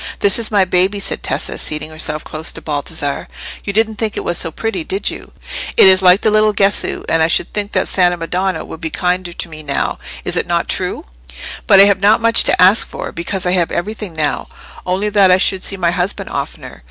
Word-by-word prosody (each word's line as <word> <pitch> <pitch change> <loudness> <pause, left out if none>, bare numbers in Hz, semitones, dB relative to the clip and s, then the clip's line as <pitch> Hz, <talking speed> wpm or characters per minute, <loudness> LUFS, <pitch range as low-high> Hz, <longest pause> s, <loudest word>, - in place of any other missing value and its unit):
"This 200 +3 +2
is 225 - -2
my 200 -3 +3
baby," 185 +3 +1
said - - -2
Tessa, - - -2
seating 150 +1 -2
herself 155 -1 -3
close 155 +1 -3
to - - -8
Baldassarre. 145 -1 -3 0.4
"You 200 - -3
didn't 220 +1 0
think 220 0 -2
it - - -3
was 175 - 0
so 165 - +1
pretty, 225 - -4
did 385 +5 -2
you? - - -11 0.5
It - - +9
is 190 0 +7
like 185 +1 +5
the 215 - +2
little 215 0 +3
Gesu, 200 0 +1
and 165 - +1
I 160 - +4
should 165 - 0
think 205 -1 -3
the - - +1
Santa 180 -2 +2
Madonna 175 0 -2
would 160 - -10
be 160 - -3
kinder 180 +1 -2
to 170 - -6
me 155 -2 -10
now, 140 -2 -2 0.3
is - - -2
it - - -1
not - - -1
true? - - -3 0.6
But 195 - +7
I - - +10
have 200 -1 +3
not 210 +3 +4
much 230 0 +3
to - - +2
ask 190 +5 +5
for, - - -7
because 185 +3 -4
I 180 - +1
have 180 -2 +1
everything 210 0 -4
now—only 180 +5 -3
that 200 -2 +4
I 180 - +5
should 190 0 +2
see 195 - -1
my 170 -2 +1
husband 180 +2 -2
oftener. - - -6
185 Hz, 225 wpm, -16 LUFS, 170-205 Hz, 0.6 s, I